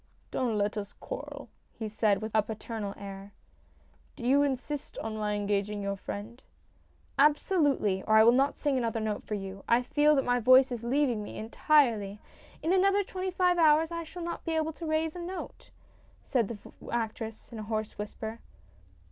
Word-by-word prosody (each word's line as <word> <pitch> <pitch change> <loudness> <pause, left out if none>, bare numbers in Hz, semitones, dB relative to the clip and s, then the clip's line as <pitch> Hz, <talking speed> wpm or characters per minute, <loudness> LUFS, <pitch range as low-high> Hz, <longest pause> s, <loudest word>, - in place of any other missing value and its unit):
" - - -36
Don't 235 -4 0
let 205 +1 0
us 205 -1 -5
quarrel," - - -7 0.3
he 220 - -3
said 215 -1 +1
with 220 - -4
a 215 - +5
paternal 215 -1 -5
air. 200 0 -9 0.4
" - - -33
Do 240 - -7
you 275 +3 +5
insist 285 +1 -2
on 220 -1 -4
my 210 -1 -1
engaging 205 0 -1
your 200 0 -1
friend? 210 +5 -7 0.4
" - - -36 0.3
"Absolutely, 290 - +3
or 215 - +4
I 220 - +8
will 230 - +7
not 270 +3 +2
sing 280 -3 +1
another 230 -2 -1
note 215 -1 -2
for 210 - -3
you. 195 -1 -6
I 235 +2 +4
feel 295 +4 +3
that 270 - +1
my 245 0 +2
voice 255 +2 +6
is 235 -2 -4
leaving 250 -2 +1
me - - -8
entirely. 225 -4 +2 0.4
In 335 - +2
another 395 +2 +4
twenty 375 0 -4
five 360 -1 +2
hours 315 +1 +5
I 335 0 -3
shall 345 +2 -8
not 340 0 -4
be 330 - -2
able 320 0 0
to 330 +1 -7
raise 315 +1 0
a - - -6
note," 360 +2 -7 0.5
said 240 -6 +1
the 230 - -6 0.3
actress, 225 -1 -4
in 230 - -7
a - - -5
hoarse 215 -2 -3
whisper. 220 +2 -5
235 Hz, 190 wpm, -29 LUFS, 210-300 Hz, 0.5 s, I